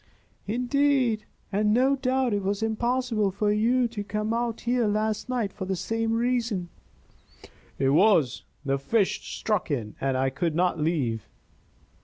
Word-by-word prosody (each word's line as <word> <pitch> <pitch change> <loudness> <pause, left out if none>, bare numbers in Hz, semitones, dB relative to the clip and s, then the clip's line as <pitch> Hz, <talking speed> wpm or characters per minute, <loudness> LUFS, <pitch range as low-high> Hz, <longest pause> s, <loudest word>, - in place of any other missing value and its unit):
"Indeed? 250 -1 +1 0.3
And 210 +1 +2
no 265 +3 +4
doubt 260 -2 0
it 205 - 0
was 200 +2 -1
impossible 230 -1 0
for 205 +2 0
you 235 +4 +2
to 215 -3 -5
come 210 +2 -2
out 235 -1 -2
here 240 -1 +1
last 215 +2 -1
night 235 -6 -1
for 200 -2 -5
the 190 0 -1
same 225 +5 -1
reason." 230 -6 0 1.1
"It 135 - +2
was. 160 - +4 0.2
The 135 0 0
fish 195 +8 +1 0.2
struck 210 -6 -1
in, 115 -8 -2
and 135 -1 0
I 130 0 +1
could 155 +4 -1
not 180 0 +1
leave." 140 -9 -1
215 Hz, 150 wpm, -26 LUFS, 180-240 Hz, 1.1 s, no